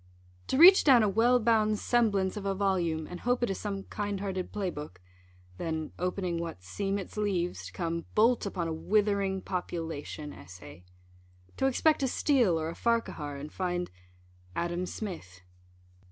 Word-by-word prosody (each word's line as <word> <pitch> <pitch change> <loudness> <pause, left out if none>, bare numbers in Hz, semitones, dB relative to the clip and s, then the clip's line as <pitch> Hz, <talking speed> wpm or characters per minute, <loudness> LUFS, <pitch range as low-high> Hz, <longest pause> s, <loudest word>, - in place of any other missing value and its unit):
To - - 0
reach 365 +5 +9
down 255 -6 +6
a - - +3
well 230 +5 +4
bound 215 -2 +2
semblance 205 -6 +1
of 210 - -5
a 195 -1 -1
volume, 175 -5 0
and 180 +2 -8
hope 245 0 0
it 240 - +1
is 195 - -4
some 195 -2 -4
kind 205 -1 -4
hearted 190 -2 -4
play 195 -3 -2
book, 150 - -8 0.6
then, 160 -2 -3
opening 180 -1 -2
what 165 - -6
"seem 195 - -2
its 200 +1 -7
leaves," 185 -4 -1
to - - -10
come 170 -1 -3
bolt 225 0 +3
upon 175 -4 -3
a 165 - -2
withering 200 +1 +1
Population 165 -4 -5
Essay. 90 -1 -12 0.7
To 265 - +2
expect 300 +4 +2
a 270 - +2
Steele, 245 - +2
or 160 0 -2
a - - -5
Farquhar, 230 -11 -1
and 145 +2 -8
find 180 -1 -2 0.6
Adam 175 +1 -2
Smith. 160 - -7
190 Hz, 165 wpm, -29 LUFS, 170-215 Hz, 0.7 s, reach